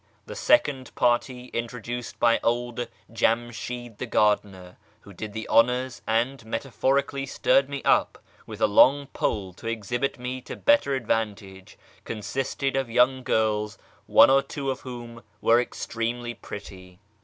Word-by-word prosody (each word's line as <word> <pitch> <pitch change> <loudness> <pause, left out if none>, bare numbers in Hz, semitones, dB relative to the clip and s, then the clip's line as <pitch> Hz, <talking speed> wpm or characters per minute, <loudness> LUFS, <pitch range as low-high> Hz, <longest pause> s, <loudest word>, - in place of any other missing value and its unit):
The - - -8
second 140 - +2
party 125 +1 0
(introduced 120 0 -5
by 115 -1 +4
old 120 0 -1 0.3
Jamshid 120 0 -2
the 125 - -4
gardener, 100 -5 0 0.2
who 100 - -14
did 105 +4 -6
the 110 +1 -5
honours, 125 +2 +2
and 120 +3 0
metaphorically 135 +4 -1
stirred 135 0 +2
me 140 -1 -5
up - - +2 0.3
with - - -9
a - - +6
long 135 +7 +5
pole 100 -7 -2
to 115 - -10
exhibit 115 +4 -2
me 125 +1 -5
to - - -8
better 285 - +3
advan 115 -3 0
tage) 95 0 -14 0.3
consisted 135 +5 -3
of 135 -3 -1
young 125 +3 +3
girls, 105 -3 0 0.3
one - - +7
or 135 0 +5
two 135 -1 -4
of 130 - -5
whom 120 -2 -9 0.2
were 115 +1 +4
extremely 120 0 -4
pretty. 95 -4 -10
120 Hz, 145 wpm, -25 LUFS, 110-130 Hz, 0.3 s, one